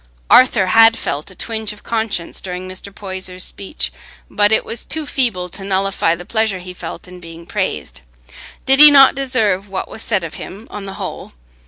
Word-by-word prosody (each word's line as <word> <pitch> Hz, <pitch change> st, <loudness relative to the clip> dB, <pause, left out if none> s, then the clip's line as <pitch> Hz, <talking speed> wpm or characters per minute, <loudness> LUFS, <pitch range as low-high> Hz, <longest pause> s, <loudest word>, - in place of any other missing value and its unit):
Arthur 240 Hz, -6 st, +6 dB
had 225 Hz, +4 st, +5 dB
felt 145 Hz, +5 st, -4 dB
a 185 Hz, -, -14 dB
twinge 220 Hz, 0 st, -4 dB
of 210 Hz, -, -17 dB
conscience 220 Hz, -7 st, -3 dB
during 185 Hz, 0 st, -6 dB
Mr. 185 Hz, +2 st, -8 dB
Poyser's 185 Hz, -2 st, -6 dB
speech, 200 Hz, +10 st, -4 dB, 0.4 s
but 205 Hz, 0 st, +2 dB
it 220 Hz, -, +2 dB
was 230 Hz, -, -4 dB
too 315 Hz, 0 st, -3 dB
feeble 230 Hz, -11 st, +1 dB
to 195 Hz, -, -8 dB
nullify 195 Hz, -3 st, 0 dB
the 175 Hz, +1 st, -10 dB
pleasure 220 Hz, -1 st, 0 dB
he 180 Hz, 0 st, -9 dB
felt 175 Hz, 0 st, -9 dB
in 180 Hz, 0 st, -12 dB
being 165 Hz, -1 st, -12 dB
praised. -, -, -4 dB, 0.6 s
Did 270 Hz, +1 st, +5 dB
he 300 Hz, 0 st, +12 dB
not 275 Hz, -2 st, +7 dB
deserve 220 Hz, -8 st, 0 dB
what 190 Hz, -1 st, -4 dB
was 220 Hz, -, -8 dB
said 210 Hz, -6 st, -1 dB
of 165 Hz, -1 st, -6 dB
him 205 Hz, +5 st, -10 dB
on 205 Hz, -1 st, -7 dB
the 195 Hz, -, -7 dB
whole? -, -, -7 dB
195 Hz, 190 wpm, -17 LUFS, 180-225 Hz, 0.6 s, he